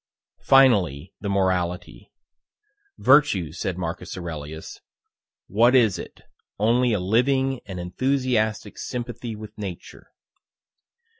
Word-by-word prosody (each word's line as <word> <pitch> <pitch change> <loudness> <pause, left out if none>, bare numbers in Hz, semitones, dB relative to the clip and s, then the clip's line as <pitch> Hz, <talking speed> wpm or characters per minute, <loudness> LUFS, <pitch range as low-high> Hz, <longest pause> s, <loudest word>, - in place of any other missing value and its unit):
Finally, 95 - +4
the 100 - -4
morality: 90 -2 -1 0.9
"Virtue," 130 - +4
said 90 +2 -4
Marcus 85 +1 -5
Aurelius, 80 -3 -7 0.7
"what 120 +6 +3
is 115 -7 +4
it, - - -10 0.4
only 120 +4 +2
a 105 - +1
living 130 +7 +1
and 95 -3 -6
enthusiastic 110 +1 -1
sympathy 120 -2 -5
with 105 0 -10
Nature?" 95 -4 -8
105 Hz, 95 wpm, -24 LUFS, 90-125 Hz, 0.9 s, Finally